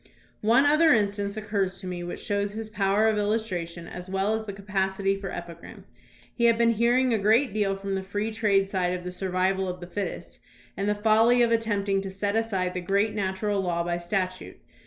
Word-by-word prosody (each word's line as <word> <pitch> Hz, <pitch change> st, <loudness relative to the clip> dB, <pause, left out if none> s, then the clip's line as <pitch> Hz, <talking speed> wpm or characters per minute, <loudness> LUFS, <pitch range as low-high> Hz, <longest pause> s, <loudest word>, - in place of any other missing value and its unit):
One 235 Hz, +6 st, +4 dB
other 305 Hz, +2 st, +5 dB
instance 205 Hz, -1 st, 0 dB
occurs 200 Hz, -3 st, -2 dB
to 190 Hz, -, -10 dB
me 180 Hz, -1 st, -4 dB
which 175 Hz, -, -6 dB
shows 205 Hz, 0 st, -1 dB
his 220 Hz, 0 st, -6 dB
power 205 Hz, +1 st, +2 dB
of 215 Hz, -1 st, +2 dB
illustration 185 Hz, -6 st, -2 dB
as 180 Hz, +1 st, -8 dB
well 195 Hz, +3 st, 0 dB
as 220 Hz, 0 st, -2 dB
the 205 Hz, -, -5 dB
capacity 195 Hz, 0 st, -1 dB
for 195 Hz, -1 st, -6 dB
epi 175 Hz, -1 st, -6 dB
gram. 170 Hz, -, -13 dB, 0.6 s
We 235 Hz, -, +4 dB
had 230 Hz, -1 st, +5 dB
been 230 Hz, 0 st, +4 dB
hearing 240 Hz, +3 st, +2 dB
a 220 Hz, -, +1 dB
great 220 Hz, +4 st, +3 dB
deal 205 Hz, -2 st, 0 dB
from 195 Hz, 0 st, -4 dB
the 190 Hz, -, -1 dB
free 205 Hz, +3 st, -3 dB
trade 200 Hz, -3 st, +2 dB
side 185 Hz, -2 st, -1 dB
of 180 Hz, -, -10 dB
the 180 Hz, -, -5 dB
"survival 190 Hz, +1 st, 0 dB
of 180 Hz, 0 st, -5 dB
the 175 Hz, -, -8 dB
fittest" 195 Hz, +3 st, -6 dB, 0.4 s
and 200 Hz, +1 st, -1 dB
the 210 Hz, -, +1 dB
folly 225 Hz, +3 st, +4 dB
of 235 Hz, -, +2 dB
attempting 205 Hz, -4 st, +1 dB
to 195 Hz, -, -5 dB
set 200 Hz, +2 st, -2 dB
aside 195 Hz, -5 st, 0 dB
the 180 Hz, -, -3 dB
great 200 Hz, +4 st, +1 dB
natural 200 Hz, 0 st, -1 dB
law 170 Hz, -2 st, -1 dB
by 175 Hz, 0 st, -2 dB
statute. 185 Hz, +1 st, -3 dB
200 Hz, 210 wpm, -26 LUFS, 190-215 Hz, 0.6 s, other